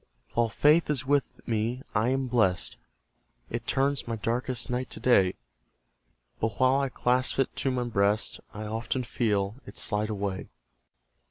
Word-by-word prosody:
While 115 -1 +2
Faith 150 +9 +4
is 135 -4 -1
with 140 0 0
me, 115 +3 -1
I 110 +3 +2
am 135 +1 +1
blest; 110 -7 +2 0.8
It 120 0 -4
turns 135 -1 +1
my 115 - -1
darkest 120 +2 -2
night 125 +1 -2
to - - -6
day; 95 -7 +4 1.0
But 110 0 0
while 130 +1 +4
I 135 -1 0
clasp 125 +1 +1
it 135 - 0
to 135 - 0
my 125 -1 0
breast, 105 -2 +1
I 105 - -6
often 115 +4 -2
feel 105 -3 0
it 100 - -10
slide 105 +1 -1
away. 100 -2 -3
120 Hz, 155 wpm, -28 LUFS, 105-130 Hz, 1.0 s, Faith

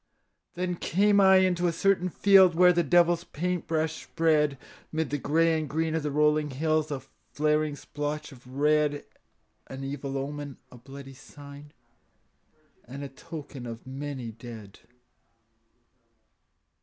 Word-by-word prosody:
Then 180 0 -2
came 200 +4 +3
I 190 0 +7
into 180 -2 +3
a - - +1
certain 185 +1 +1
field 190 -1 +5
Where 180 +1 +6
the 175 - +2
devil's 175 +2 +3
paint 180 +2 -3
brush 160 0 -1
spread 155 -4 +1 0.3
'Mid 160 -3 -2
the 145 - -1
gray 165 +4 +2
and 155 -2 -5
green 160 +2 -1
of 160 - 0
the 150 - -2
rolling 150 +1 +2
hills 155 +3 0
A 140 -3 -4 0.3
flaring 150 0 +1
splotch 150 +1 -5
of 125 -2 -16
red, 145 +2 +1 0.6
An 135 +1 -8
evil 135 0 -4
omen, 145 0 -5
a 125 - -12
bloody 135 +2 -11
sign, 145 +2 -13 1.1
And 140 +3 -8
a 140 - -6
token 140 -3 -9
of 115 -1 -8
many 130 -2 -6
dead. 110 -3 -11
150 Hz, 140 wpm, -27 LUFS, 140-165 Hz, 1.1 s, I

